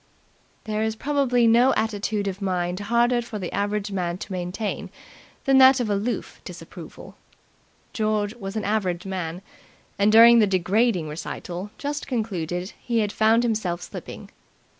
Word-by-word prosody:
There 215 -1 -2
is 220 0 -1
probably 260 -2 +1
no 240 +3 +5
attitude 210 -1 -1
of 195 +1 -4
mind 180 -1 -1
harder 235 +3 +2
for 230 -2 -7
the 185 -4 -5
average 205 0 -1
man 175 -2 -2
to 200 - -9
maintain 185 +4 -4 0.6
than 270 -1 +5
that 265 0 +7
of 225 -4 -1
aloof 205 +4 -3
disapproval. - - -11 0.8
George 215 -2 0
was 195 -2 -7
an 215 - -2
average 195 -4 -1
man, 180 -2 -4 0.6
and 205 +1 +4
during 230 +1 +8
the 215 - +4
degrading 190 0 +1
recital 175 +4 -6
just 290 +1 -4
concluded 185 - -3
he 235 -2 0
had 205 -1 -1
found 225 +2 +3
himself 195 -7 -1
slipping. - - -9
210 Hz, 145 wpm, -24 LUFS, 185-230 Hz, 0.8 s, during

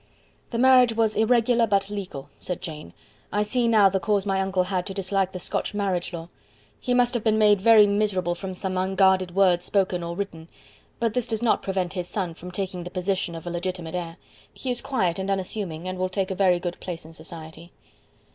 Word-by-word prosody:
"The 235 - -3
marriage 250 -2 +5
was 220 -1 +2
irregular, 230 +1 +3
but 200 -1 +1
legal," 180 -9 -6
said 180 - -4
Jane. 150 - -8 0.4
"I 205 0 +1
see 235 +3 +1
now 215 -3 +6
the 195 0 +1
cause 205 -1 0
my 195 -1 +1
uncle 190 -1 +1
had 180 -1 -2
to 195 - -5
dislike 195 -1 0
the 185 - -6
Scotch 195 - -3
marriage 190 -4 -1
law. 170 -1 -7 0.5
He 245 - 0
must 245 0 +3
have 240 -3 -1
been 220 -1 +3
made 210 -2 +4
very 220 0 +7
miserable 200 -4 +1
from 185 +1 -6
some 185 0 -3
unguarded 190 -1 +2
words 180 -3 +4
spoken 185 -2 0
or 170 0 -4
written; 170 -4 -6 0.5
but 230 -2 0
this 245 0 -1
does 225 0 -2
not 235 - +3
prevent 190 -2 -2
his 180 -2 -4
son 185 -4 -3
taking 180 +1 -5
the 175 - -6
position 185 -1 -2
of 165 - -8
a 175 - -4
legitimate 175 -1 -4
heir. 170 -1 -4 0.3
He 255 - -4
is 245 - -2
quiet 195 -11 0
and 190 +1 -3
unassuming, 185 -3 -3
and 185 0 -4
will 185 0 0
take 190 0 -2
a - - 0
very 185 -2 +3
good 175 0 -5
place 170 -3 -6
in 160 - -12
society." 160 +1 -10
190 Hz, 210 wpm, -25 LUFS, 175-210 Hz, 0.5 s, very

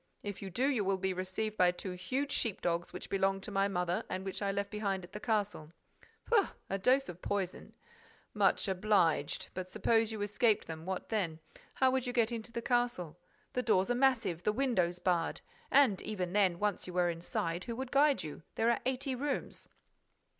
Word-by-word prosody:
If 205 -1 -5
you 195 - -5
do, 240 +9 0
you 255 -7 +1
will 195 0 +1
be 190 0 -1
received 185 +4 -3
by 180 -1 +5
two 180 +1 -4
huge 255 +11 -2
sheep 225 -8 0
dogs 170 0 -1
which 180 - -7
belonged 195 0 +1
to 210 - -5
my 195 0 +2
mother 180 -2 -1
and 185 +1 -3
which 195 0 -4
I 200 -1 +1
left 200 0 -2
behind 200 -3 -1
at 175 - -11
the 210 - -5
castle." 205 -8 -1 0.5
"Pooh! 440 -4 +4 0.2
A 195 - 0
dose 260 +7 +3
of 175 0 -8
poison—" 195 -3 -3 0.6
"Much - - +3
obliged. 185 -6 +2
But 185 0 -5
suppose 225 +2 +2
you 220 - -5
escaped 210 +1 +2
them. 160 +1 -7
What 190 -1 -3
then? 185 -8 -1 0.4
How 260 -1 +4
would 260 -1 0
you 245 - -2
get 235 -1 +2
into 235 0 -5
the 235 0 -4
castle? 240 - 0 0.3
The 250 - +1
doors 215 -2 +2
are - - +4
massive, 245 -9 +2
the 210 - +2
windows 210 -8 +1
barred. 175 -2 0 0.3
And, 260 -8 +5
even 185 -4 -3
then, 190 -4 +3
once 205 -1 -1
you 180 - -6
were 175 -1 +2
inside, 170 +1 -3
who 235 - -4
would 260 +1 -5
guide 285 0 +4
you? 155 -1 -7
There 230 +1 +3
are 235 - 0
eighty 265 +1 -1
rooms." 280 +3 -3
200 Hz, 200 wpm, -33 LUFS, 180-235 Hz, 0.6 s, by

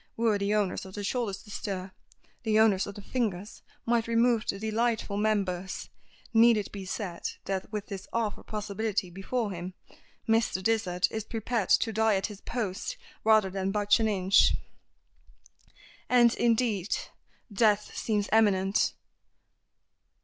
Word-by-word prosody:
Were 225 -3 +2
the 200 +1 +1
owners 205 -3 0
of 190 - -11
the 205 - -4
shoulders 210 -2 -2
to 210 - -13
stir, 190 -2 -4 0.5
the 220 -2 +1
owners 210 -4 +4
of 200 - -7
the 205 - -9
fingers 210 -5 -3 0.2
might 230 -1 +1
remove 230 -1 +2
the 195 - -1
delightful 220 0 -1
members. 195 -4 -1 0.4
Need 230 0 +6
it 205 - -3
be 195 -2 -7
said 185 -2 -4 0.2
that, 195 +1 -3
with 210 -1 -3
this 195 -3 -7
awful 225 -3 -2
possibility 210 -2 -3
before 205 +4 -2
him, 180 0 -6 0.5
Mr. 225 -4 +1
Dysart 185 -5 +1
is 220 -1 -3
prepared 225 -2 -2
to 225 - +3
die 220 -1 +3
at 190 - 0
his 200 - -14
post 230 - -3 0.3
rather 215 -3 +4
than 190 0 -2
budge 205 +1 +3
an 220 - +2
inch. 195 -1 +4 1.6
And, 240 -2 +5
indeed, 225 -5 +1 0.6
death 210 0 +2
seems 210 -2 -1
imminent. 200 -3 +3
210 Hz, 140 wpm, -28 LUFS, 195-225 Hz, 1.6 s, Need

